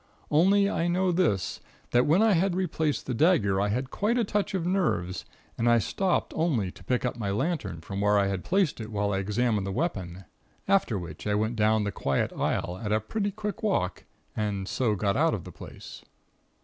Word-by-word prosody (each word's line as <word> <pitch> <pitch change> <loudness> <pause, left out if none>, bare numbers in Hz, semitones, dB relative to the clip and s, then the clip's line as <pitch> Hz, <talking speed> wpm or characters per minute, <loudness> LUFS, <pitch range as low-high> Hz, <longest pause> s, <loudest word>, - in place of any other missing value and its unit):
Only 195 +6 +4
I 170 -4 0
know 180 +1 +2
this, 165 - 0 0.3
that 120 +3 +3
when 170 +8 +4
I 225 - +5
had 185 0 +2
replaced 160 -5 -1
the 130 - -2
dagger 110 - +3
I 100 - +1
had 125 +6 -2
quite 220 +4 0
a 240 - +3
touch 205 -1 -1
of 175 -3 -1
nerves 175 - 0 0.3
and 115 +1 +3
I 120 - +6
stopped 185 - 0
only 130 - 0
to - - -16
pick 125 0 0
up 125 - -2
my 100 -3 -2
lantern 105 - -2
from 100 +4 -5
where 105 0 +3
I 100 - +3
had 95 -2 -2
placed 185 - +1
it 110 0 -7
whilst 100 -1 0
I - - 0
examined 105 0 0
the - - -2
weapon, 95 - -3 0.4
after 190 - +2
which 85 0 -7
I 105 - +1
went 110 +3 0
down 110 0 +3
the 100 - -2
quiet 70 -7 -1
aisle 90 +1 -2
at 105 - -2
a 110 - +3
pretty 205 - -2
quick 210 +2 -5
walk, 190 - -1 0.3
and 100 -3 -2
so 115 -3 0
got 100 0 0
out 160 +4 +3
of 95 - -7
the - - -9
place. - - -11
120 Hz, 210 wpm, -27 LUFS, -, 0.4 s, I